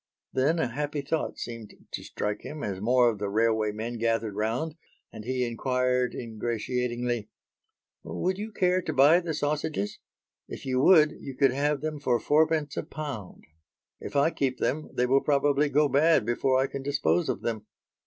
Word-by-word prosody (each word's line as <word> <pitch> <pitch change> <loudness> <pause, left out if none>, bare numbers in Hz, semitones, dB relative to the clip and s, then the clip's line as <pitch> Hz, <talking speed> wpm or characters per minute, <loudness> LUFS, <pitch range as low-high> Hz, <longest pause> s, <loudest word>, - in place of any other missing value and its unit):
Then 140 +6 +2
a 160 - +1
happy 145 +4 -3
thought 155 +3 -2
seemed 115 -3 -7 0.2
to - - -5
strike 105 0 -3
him 150 -1 -7
as 95 -2 -3
more 125 +2 +4
of 105 - -8
the 100 -1 -2
railway 110 0 +2
men 115 +3 -5
gathered 115 -2 0
round, 115 +9 -1 0.4
and 110 -1 -9
he 125 0 0
inquired 125 +1 0
ingratiatingly, 120 0 -2 0.7
"Would 185 +2 -2
you 215 +2 -5
care 185 -2 +2
to 155 - -3
buy 145 +5 +6
the 170 -3 -3
sausages; 145 -7 -2 0.5
if - - -8
you 130 -1 0
would, 155 -2 +6
you 135 - -8
could 135 -1 +4
have 145 +2 0
them 155 -1 -3
for 125 -4 +1
fourpence 150 +2 +2
a - - +1
pound? 140 -11 -7 0.5
If - - -8
I 145 +4 +4
keep 130 -4 -1
them, 155 +1 -1
they 125 - +1
will 135 +2 +3
probably 145 0 +2
go 150 +1 +3
bad 145 -3 +3
before 130 +3 +1
I 135 - +3
can 140 0 -5
dispose 145 +4 +1
of - - -2
them." 110 -2 -3
130 Hz, 175 wpm, -27 LUFS, 115-150 Hz, 0.7 s, buy